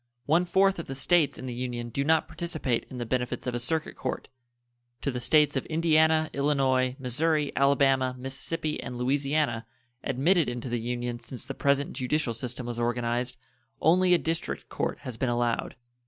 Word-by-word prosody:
One 165 +6 +3
fourth 190 +1 +3
of 165 - -5
the 135 - -5
States 155 +3 +3
in - - -7
the 125 - -4
Union 120 -1 -4
do 140 +4 -1
not 160 +2 +3
participate 160 -7 -2
in 130 - -8
the 120 - -3
benefits 125 +1 -2
of 125 - -2
a 120 - -1
circuit 155 +6 0
court. 130 - -4 0.7
To 140 - -1
the 125 - -3
States 150 +3 +4
of 135 - 0
Indiana, 160 -1 +3
Illinois, 135 -3 +2
Missouri, 145 +3 0
Alabama, 135 -2 +3
Mississippi, 150 +5 -3
and 125 - -6
Louisiana, 135 -2 0 0.4
admitted 160 +4 +2
into 120 +1 -4
the 120 0 -1
Union 120 +1 -3
since 125 0 -7
the - - -5
present 140 0 +1
judicial 130 -1 -1
system 125 +2 -4
was 120 -1 -4
organized, 120 +1 -1 0.4
only 180 +3 +5
a - - +4
district 165 0 -3
court - - -2
has 125 -4 -6
been 130 - 0
allowed. 120 -1 0
135 Hz, 175 wpm, -28 LUFS, 120-155 Hz, 0.7 s, only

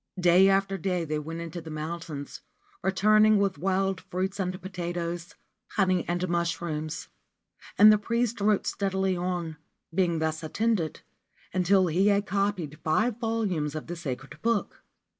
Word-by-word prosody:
Day 180 +2 +6
after 195 0 +1
day 180 -1 -1
they 155 0 -2
went 165 +2 -6
into 170 +1 -6
the 160 - -9
mountains, 155 -1 -6 0.4
returning 215 +3 +4
with 195 -7 0
wild 190 +1 0
fruits 190 +2 -2
and 185 -1 -2
potatoes, 175 -2 -4 0.4
honey 185 -3 +2
and 175 +1 -1
mushrooms; 165 -2 -2 0.7
and 215 +1 +9
the 210 - +2
priest 235 0 -1
wrote 210 0 +2
steadily 190 -1 0
on, 175 -3 -3 0.4
being 175 -2 +2
thus 160 0 -1
attended, 170 0 -1 0.5
until 185 +1 +4
he 180 +4 +2
had 205 0 +3
copied 195 -7 -1
five 210 +9 +1
volumes 200 -10 -1
of 155 - -5
the 175 - -5
sacred 135 -5 -6
book. 230 -2 -1
180 Hz, 140 wpm, -27 LUFS, 165-195 Hz, 0.7 s, and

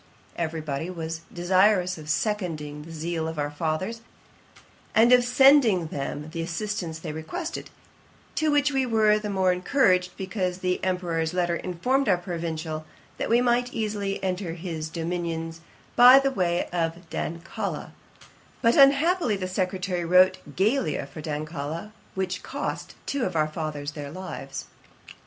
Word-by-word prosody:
Every 165 -1 -2
body 150 +2 -3
was 165 -2 -4
very - - -19
desirous 185 +1 +3
of 150 -1 -10
seconding 155 -7 -2
the 165 - -10
zeal 165 0 -3
of 160 -1 -5
our 145 0 -1
fathers, 165 +9 -2 0.9
and 235 +3 +6
of 250 -1 +6
sending 245 - +5
them 145 +2 -4
the 165 0 -3
assistance 175 -1 -3
they 160 - -6
requested; 315 - -5 0.6
to 315 - +1
which 290 0 +3
we 270 -1 +1
were 215 -3 +3
the 210 0 -4
more 190 -2 +2
encouraged, 180 -1 +2
because 185 -2 -2
the 180 -1 -1
Emperour's 175 -3 -1
letter 175 -1 +1
informed 220 +10 0
our 185 - +4
Provincial, 165 -3 -4 0.4
that - - -2
we 235 +2 +4
might 245 0 +1
easily 205 -3 -2
enter 185 -2 -2
his 165 -2 -5
dominions 165 -1 -3 0.3
by 250 +2 +10
the 275 0 +3
way 175 -7 0
of 170 0 -2
Dancala; 170 +1 -4 0.7
but, 230 0 +5
unhappily, 280 - +5
the 185 -1 -3
secretary 185 -1 -1
wrote 180 +2 +5 0.2
Geila 210 - +1
for 155 - -8
Dancala, 155 +4 -4 0.2
which 185 -1 -2
cost 285 +2 -5
two 280 -3 -1
of 185 -5 -2
our 155 -1 +3
fathers 155 -2 -4
their 145 -2 -7
lives.' 145 -5 -6
180 Hz, 145 wpm, -26 LUFS, 160-215 Hz, 0.9 s, by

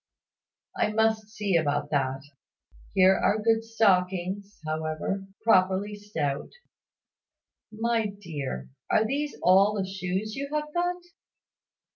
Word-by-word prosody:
I 210 - +1
must 220 -1 +1
see 205 -3 -1
about 145 -2 +1
that. 135 -2 0 0.7
Here 190 0 +6
are 210 - +2
good 225 +1 +2
stockings, 195 -2 0
however 155 +5 -3 0.2
properly 195 -1 +3
stout. 165 -10 -3 1.2
My 225 0 0
dear, 145 - -6 0.2
are 220 - +3
these 285 +5 -2
all 195 +4 +5
the 195 -2 -1
shoes 190 +2 -3
you 280 +1 -4
have 300 0 -2
got?" 355 0 -1
200 Hz, 110 wpm, -27 LUFS, 175-220 Hz, 1.2 s, Here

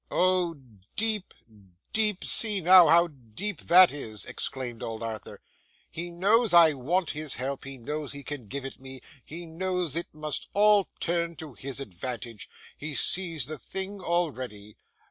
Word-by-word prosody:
'Oh 180 -2 +1 0.4
deep, 215 -3 +1 0.6
deep! 215 -3 +1
See 210 -3 +4
now 180 0 +7
how 170 +3 +6
deep 145 - -5
that 180 +1 +7
is!' 110 -7 -4
exclaimed 125 -3 -4
old 115 0 -5
Arthur. 110 -1 -7 0.5
'He 175 +2 -6
knows 200 +4 +2
I 165 -3 +7
want 160 +7 -1
his 150 -2 -3
help, 135 +2 -4
he 135 0 -7
knows 150 +4 -5
he 140 0 -7
can 140 -7 -7
give 140 +5 -5
it 135 - -8
me, 130 -1 -10 0.2
he 170 +3 -9
knows 175 -1 -3
it 170 - -3
must 155 -1 -4
all 205 -1 +4
turn 170 0 -1
to 155 -3 -10
his 135 +5 -5
advantage, 115 0 -7 0.3
he 150 0 -6
sees 165 -7 +3
the 155 +1 -7
thing 190 - -5
already. 130 - -3
155 Hz, 155 wpm, -27 LUFS, 130-180 Hz, 0.6 s, now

